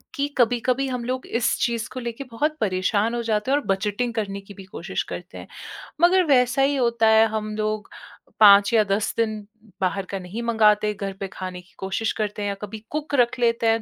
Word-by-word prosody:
कि 285 Hz, 0 st, 0 dB
कभी-कभी 245 Hz, +2 st, +2 dB
हम 250 Hz, -2 st, -3 dB
लोग 255 Hz, +1 st, -3 dB
इस 230 Hz, 0 st, 0 dB
चीज़ 235 Hz, -2 st, 0 dB
को 255 Hz, -, -5 dB
लेके 235 Hz, +2 st, -5 dB
बहुत 300 Hz, +7 st, -1 dB
परेशान 205 Hz, +3 st, +1 dB
हो 240 Hz, -, -1 dB
जाते 220 Hz, +2 st, -1 dB
हैं 280 Hz, -, +4 dB
और 290 Hz, -, -3 dB
बजटिंग 210 Hz, +5 st, -1 dB
करने 200 Hz, -3 st, -3 dB
की 195 Hz, +1 st, -13 dB
भी 195 Hz, -, -11 dB
कोशिश 190 Hz, -, -4 dB
करते -, -, -7 dB
हैं। -, -, -9 dB, 0.5 s
मगर 365 Hz, +2 st, +5 dB
वैसा 255 Hz, -2 st, +3 dB
ही 280 Hz, +1 st, +3 dB
होता 235 Hz, -3 st, +2 dB
है, 220 Hz, 0 st, +6 dB
हम 215 Hz, -1 st, -4 dB
लोग 215 Hz, -1 st, -2 dB, 0.5 s
5 200 Hz, 0 st, +7 dB
या 220 Hz, -2 st, +5 dB
10 200 Hz, +1 st, -1 dB
दिन 215 Hz, -2 st, -1 dB, 0.3 s
बाहर 190 Hz, +1 st, 0 dB
का 195 Hz, -, -3 dB
नहीं 185 Hz, +5 st, -6 dB
मँगाते, 215 Hz, -2 st, +3 dB
घर 195 Hz, -1 st, -5 dB
पे 195 Hz, -, -3 dB
खाने 185 Hz, -1 st, -6 dB
की 180 Hz, -, -26 dB
कोशिश 195 Hz, +4 st, -2 dB
करते 210 Hz, -1 st, -3 dB
हैं 205 Hz, -, -1 dB
या 200 Hz, -, -3 dB
कभी 210 Hz, +1 st, -7 dB
कुक 300 Hz, -1 st, -3 dB
रख 245 Hz, -1 st, +2 dB
लेते 230 Hz, -1 st, +2 dB
हैं, 225 Hz, 0 st, +2 dB
220 Hz, 215 wpm, -23 LUFS, 205-245 Hz, 0.5 s, 5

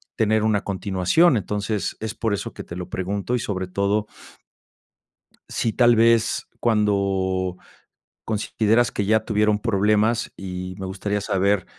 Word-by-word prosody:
tener 110 Hz, 0 st, +2 dB
una 110 Hz, -2 st, +1 dB
continuación. 100 Hz, -, +2 dB
Entonces, 105 Hz, +1 st, -2 dB
es 110 Hz, 0 st, -5 dB
por 110 Hz, -2 st, -1 dB
eso 100 Hz, -, -4 dB
que -, -, -8 dB
te 85 Hz, -, -9 dB
lo 90 Hz, 0 st, -6 dB
pregunto 100 Hz, +5 st, -2 dB
y 125 Hz, -, 0 dB
sobre 95 Hz, -4 st, -3 dB
todo 100 Hz, +3 st, 0 dB, 1.4 s
sí 115 Hz, -, -1 dB
tal 120 Hz, -1 st, +5 dB
vez, 115 Hz, 0 st, +3 dB
cuando 95 Hz, -4 st, +1 dB, 0.7 s
consideras 110 Hz, +2 st, +1 dB
que 100 Hz, -, -2 dB
ya 110 Hz, +2 st, +2 dB
tuvieron 105 Hz, -1 st, +2 dB
problemas, 105 Hz, +1 st, +1 dB
y 90 Hz, -1 st, -6 dB
me 95 Hz, -, -4 dB
gustaría 100 Hz, +2 st, -3 dB
saber, 95 Hz, 0 st, +1 dB
105 Hz, 135 wpm, -23 LUFS, 95-110 Hz, 1.4 s, tal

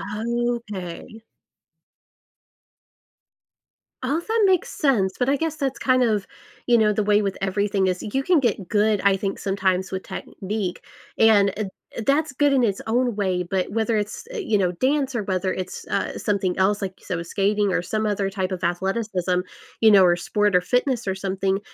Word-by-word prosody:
Okay. 220 Hz, -2 st, -4 dB, 2.8 s
All 280 Hz, +6 st, 0 dB
that 445 Hz, +5 st, 0 dB
makes 370 Hz, -3 st, +2 dB
sense, 210 Hz, -10 st, +1 dB
but 250 Hz, -, +1 dB
I 275 Hz, -, +4 dB
guess 320 Hz, +1 st, -2 dB
that's 270 Hz, -2 st, -2 dB
kind 255 Hz, -1 st, +3 dB
of, 210 Hz, -4 st, +1 dB, 0.4 s
you 240 Hz, -1 st, +5 dB
know, 215 Hz, -1 st, +4 dB
the 215 Hz, -, 0 dB
way 210 Hz, 0 st, +3 dB
with 195 Hz, -2 st, -2 dB
everything 195 Hz, 0 st, 0 dB
is, 180 Hz, 0 st, -1 dB
you 265 Hz, +6 st, -2 dB
can 350 Hz, +3 st, +3 dB
get 215 Hz, -9 st, -1 dB
good, 210 Hz, -1 st, +2 dB
I 200 Hz, -1 st, +4 dB
think, 195 Hz, 0 st, -3 dB
sometimes 190 Hz, -1 st, 0 dB
with 190 Hz, 0 st, -4 dB
technique, 195 Hz, -2 st, -5 dB, 0.3 s
and, 210 Hz, -3 st, +5 dB
eh 215 Hz, -, -2 dB, 0.3 s
eh, -, -, -3 dB
that's 290 Hz, +1 st, +2 dB
good 290 Hz, +1 st, +3 dB
in 265 Hz, -2 st, +3 dB
its 200 Hz, -4 st, 0 dB
own 240 Hz, 0 st, +1 dB
way, 185 Hz, -3 st, 0 dB
but 185 Hz, +2 st, -2 dB
whether 225 Hz, 0 st, 0 dB
it's, 215 Hz, -, -4 dB
eh, -, -, -6 dB
you 225 Hz, -, +1 dB
know, 180 Hz, -2 st, +1 dB
dance 270 Hz, +7 st, 0 dB
or 230 Hz, -, -1 dB
whether 185 Hz, -1 st, -1 dB
it's, 185 Hz, -1 st, -6 dB
uh, -, -, -2 dB
something 195 Hz, -4 st, -1 dB
else, 200 Hz, +2 st, +2 dB
like 190 Hz, -, -2 dB
you -, -, -21 dB
said, 180 Hz, -, -2 dB
with 170 Hz, +1 st, -5 dB
skating 200 Hz, +1 st, +1 dB
or -, -, +1 dB
some 215 Hz, +5 st, -2 dB
other 205 Hz, -2 st, 0 dB
type 190 Hz, -1 st, -3 dB
of 185 Hz, -1 st, -4 dB
athleticism, 185 Hz, 0 st, -1 dB, 0.4 s
you 220 Hz, -, +6 dB
know, 195 Hz, -3 st, +7 dB
or 175 Hz, -1 st, +5 dB
sport, 205 Hz, +3 st, 0 dB
or 180 Hz, -, +6 dB
fitness 245 Hz, +4 st, 0 dB
or 190 Hz, -, 0 dB
something, 190 Hz, 0 st, -1 dB
205 Hz, 190 wpm, -23 LUFS, 190-240 Hz, 2.8 s, know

